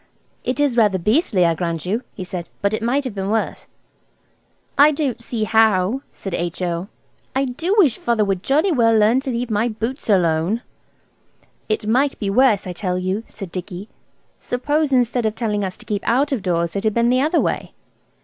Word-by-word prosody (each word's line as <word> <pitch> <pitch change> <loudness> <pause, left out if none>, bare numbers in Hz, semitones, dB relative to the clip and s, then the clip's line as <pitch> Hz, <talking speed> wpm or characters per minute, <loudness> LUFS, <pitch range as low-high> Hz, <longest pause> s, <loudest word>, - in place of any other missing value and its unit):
"It 255 +3 -2
is 285 -4 +2
rather 210 -4 +4
beastly, 210 - +2
I 165 - +3
grant 165 -1 -3
you," 210 +6 -1
he - - -5
said, 180 -2 -6
"but 200 +1 +2
it 215 - -1
might 255 +5 +1
be 210 -7 -4
worse." 215 +3 -2 1.1
"I 290 +2 +7
don't 280 -6 -2
see 230 -1 -3
how," 220 +1 +3
said 195 - -7
H.O. 175 +1 -2 0.5
"I 270 +1 +2
do 325 +10 -1
wish 300 - +4
Father 230 -3 +1
would 195 -2 -1
jolly 305 - +2
well 230 -6 +4
learn 220 +4 +4
to 270 0 -5
leave 240 -1 -2
my 215 +3 +1
boots 230 +3 -4
alone." 180 +3 +2 1.1
"It 215 0 -1
might 265 +6 +2
be 200 -3 -2
worse, 220 -3 +3
I 180 - -5
tell 180 0 -2
you," 185 +4 -2
said 195 -5 -9
Dicky. 185 +2 -7 0.5
"Suppose 290 +4 -1
instead 245 -2 +2
of 215 - -3
telling 210 -3 -1
us 185 -1 -4
to - - -14
keep 205 -2 -2
out 275 +6 +2
of 265 -6 -1
doors 170 -2 -1
it 200 - -2
had 215 -2 +1
been 235 0 +3
the 255 +1 +3
other 315 +4 +2
way?" - - -1
220 Hz, 190 wpm, -20 LUFS, 190-255 Hz, 1.1 s, I